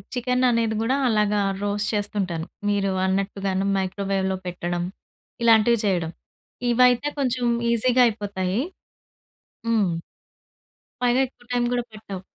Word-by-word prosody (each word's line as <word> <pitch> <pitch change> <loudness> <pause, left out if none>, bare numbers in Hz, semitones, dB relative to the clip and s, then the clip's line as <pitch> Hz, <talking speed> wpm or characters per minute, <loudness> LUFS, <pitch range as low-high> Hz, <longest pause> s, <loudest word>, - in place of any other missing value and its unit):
Chicken 250 +1 +1
అనేది 230 -2 +1
గూడా 255 +4 +1
అలాగా 210 -2 +2 0.2
రోస్ట్ 205 +1 -1
చేస్తుంటాను. 195 -5 -2 0.2
మీరు 200 -1 +1
అన్నట్టుగాను 195 0 -1
మైక్రోవేవ్‌లో 190 0 -1
పెట్టడం, 175 0 -2 0.6
ఇలాంటివి 230 0 +5
చేయడం. 175 -5 0 0.6
ఇవయితే 250 +2 +4
కొంచెం 255 -2 0 0.3
ఈజీ‌గా 250 +2 +4
అయిపోతాయి. 200 -3 -2 1.1
హ్మ్. 220 -5 +2 1.1
పైగా 245 +1 +3
ఎక్కువ 245 - -24
టైం 245 -1 +1
గూడా 245 -1 0
పట్టవు. 200 -3 -8
210 Hz, 105 wpm, -24 LUFS, 190-240 Hz, 1.1 s, ఇలాంటివి